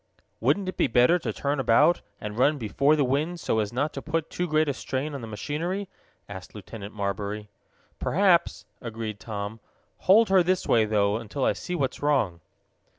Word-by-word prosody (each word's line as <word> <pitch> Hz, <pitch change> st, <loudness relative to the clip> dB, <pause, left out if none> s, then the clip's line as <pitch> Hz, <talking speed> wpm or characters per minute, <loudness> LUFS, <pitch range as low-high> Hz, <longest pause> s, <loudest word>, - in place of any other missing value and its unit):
"Wouldn't 200 Hz, -2 st, +1 dB
it 185 Hz, -, -4 dB
be -, -, +3 dB
better 125 Hz, +10 st, +4 dB
to -, -, -3 dB
turn 140 Hz, 0 st, -2 dB
about, 135 Hz, +7 st, +4 dB, 0.2 s
and 105 Hz, 0 st, -6 dB
run 145 Hz, +5 st, +3 dB
before 140 Hz, +6 st, +2 dB
the 145 Hz, -, +2 dB
wind, 150 Hz, +7 st, -1 dB
so 110 Hz, -, 0 dB
as 105 Hz, -1 st, -1 dB
not 145 Hz, +5 st, -1 dB
to 135 Hz, -, -5 dB
put 160 Hz, +1 st, -2 dB
too 180 Hz, -, -2 dB
great 155 Hz, -1 st, +2 dB
a 140 Hz, -, 0 dB
strain 135 Hz, +3 st, -3 dB
on 140 Hz, -, -5 dB
the 115 Hz, -, -7 dB
machinery?" 165 Hz, -, -3 dB, 0.4 s
asked 95 Hz, -1 st, -10 dB
Lieutenant 105 Hz, 0 st, -9 dB
Marbury. 100 Hz, +1 st, -3 dB, 0.5 s
"Perhaps," 180 Hz, -1 st, +2 dB, 0.2 s
agreed 110 Hz, -3 st, -5 dB
Tom. 105 Hz, 0 st, -5 dB, 0.5 s
"Hold 215 Hz, +2 st, +7 dB
her 190 Hz, -1 st, +6 dB
this 185 Hz, +1 st, +1 dB
way, 110 Hz, -2 st, +4 dB
though, 105 Hz, -1 st, +1 dB
until 115 Hz, +4 st, -3 dB
I -, -, +3 dB
see 180 Hz, -, -5 dB
what's 135 Hz, -6 st, -2 dB
wrong!" 130 Hz, -, +1 dB
135 Hz, 185 wpm, -26 LUFS, 110-160 Hz, 0.5 s, Hold